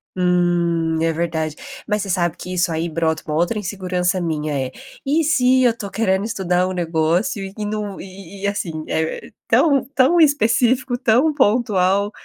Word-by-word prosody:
Hum, 175 -2 +1
é 165 0 +1
verdade. 160 -2 -2 0.3
Mas 210 0 0
você 195 - -5
sabe 175 -2 0
que 180 - -7
isso 180 -1 +1
aí 165 +1 -2
brota 160 0 -1
com 155 - -7
uma 150 - 0
outra 175 +6 0
insegurança 185 -2 -1
minha, 155 -3 -2
eh. - - -11 0.3
E 310 +4 +2
se 260 -4 +3
eu 235 -2 +2
tô 200 - -6
querendo 195 -3 0
estudar 185 -5 0
o - - -3
negócio 170 +4 0
e 210 - -3
não 210 -2 -4
e 195 0 -11
e - - -10
e - - +1
assim, 170 -6 -3
é 160 0 -3 0.2
tão 280 -5 +3
tão 275 +7 +4
específico, 255 -4 +2
tão 250 +5 +3
pontual. 205 -6 +2
190 Hz, 175 wpm, -20 LUFS, 170-225 Hz, 0.3 s, tão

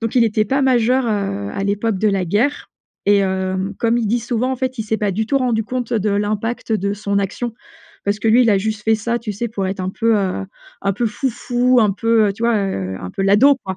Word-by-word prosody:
donc 225 -1 -3
il 250 - +5
était 215 -1 +1
pas 270 +6 0
majeur, 255 0 +3
heu, 150 - -2
à 195 - -3
l'époque 205 +1 0
de 215 - +1
la 195 -2 0
guerre 225 - 0 0.4
et, 200 -1 +4
heu, 190 0 -1 0.2
comme 230 +1 +2
il 230 - -1
dit 235 +3 +1
souvent 240 +2 -1
en 260 - -2
fait 260 -1 -3
il 220 - -2
s'est 220 0 -1
pas 205 -1 0
du 215 +4 -2
tout 275 - +1
rendu 240 -4 0
compte 245 +1 -4
de 215 -2 +1
l'impact 210 +3 -2
de 200 -2 0
son 200 -1 -1
action. 210 +4 -3 0.5
Parce 200 +1 0
que 225 - +1
lui 240 +3 +6
il 230 - +3
a 200 - +4
juste 215 +1 -3
fait 220 - +4
ça 235 +2 -1
tu 230 -3 -5
sais? 235 +4 -3
Pour 200 -3 -3
être 190 0 -3
un 185 0 -2
peu, 225 +2 +1
heu, 195 -1 -1 0.4
un 200 - +1
peu 230 +5 -1
fou 260 +5 -1
fou, 245 +1 +2
un 210 -3 +4
peu, 225 +1 +2
heu, - - -1
tu 220 - -9
vois? 235 -1 +3
Heu, 95 - -2
un 90 - -6
peu 195 - -3
l'ado 210 +9 +5
quoi. 190 -1 -4
215 Hz, 260 wpm, -19 LUFS, 200-235 Hz, 0.5 s, lui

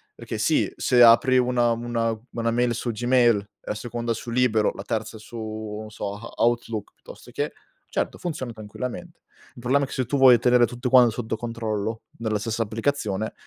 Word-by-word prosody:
Perché - - -6
sì, - - +2
se 120 -1 +3
apri 120 +3 +6
una 125 -1 +2
una 115 -1 -1
una 115 -1 -1
mail 120 0 +1
su 120 +1 -3
Gmail, 120 -3 +2
la - - -4
seconda 120 +1 -3
su 115 +1 -7
libero, 115 -3 +2
la - - -8
terza 110 +1 -3
su, 110 -1 -6
non 110 0 -8
so, 100 -1 -4
a 115 - -10
Outlook 115 -2 -1
piuttosto - - -14
che, - - -2 0.4
certo, - - -2
funziona 150 -8 -4
tranquillamente. 125 +10 -7 0.4
Il - - -12
problema 135 +4 +2
è - - -11
che - - -9
se 130 - -1
tu 140 +2 0
vuoi 130 -3 +7
tenere 125 0 +4
tutto 120 +2 -4
quan 125 -2 +7
sotto 110 0 -3
controllo 110 -1 -3 0.2
nella 110 -2 -1
stessa 115 +1 -1
applicazione, 110 -2 -2
115 Hz, 185 wpm, -24 LUFS, 110-125 Hz, 0.4 s, vuoi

